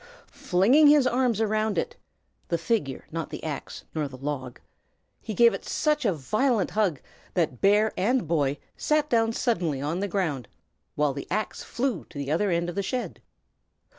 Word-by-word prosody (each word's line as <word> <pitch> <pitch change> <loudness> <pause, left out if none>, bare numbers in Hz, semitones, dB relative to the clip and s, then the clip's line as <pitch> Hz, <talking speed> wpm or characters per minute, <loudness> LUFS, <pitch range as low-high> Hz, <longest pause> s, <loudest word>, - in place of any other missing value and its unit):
Flinging 235 +13 +4
his 290 -2 +6
arms 245 -3 +1
round 215 -1 0
it 475 0 -1 0.5
(the 170 - 0
figure, 165 - -1
not 165 0 -4
the - - -7
axe 150 -3 -5
nor 155 -2 -1
the 130 -2 -10
log), 130 -2 -5 0.6
he 215 - -5
gave 235 +1 +6
it - - -5
such 300 -3 0
a 205 - +4
violent 215 - 0
hug 200 -10 +1 0.4
that 160 -8 0
bear 210 +2 +4
and 235 +1 +1
boy 145 -3 +1 0.2
sat 300 0 +1
down 225 -1 +3
suddenly 175 - 0
on 150 +6 -2
the 200 - -1
ground, 160 - -2 0.5
while 150 -2 +1
the 140 - -6
axe 215 0 -2
flew 245 -6 -2
to 155 - -13
the 140 0 -3
other 195 +6 +1
end 170 -1 0
of 175 - -4
the 200 - -1
shed. 250 +5 -4
195 Hz, 175 wpm, -26 LUFS, 150-235 Hz, 0.6 s, his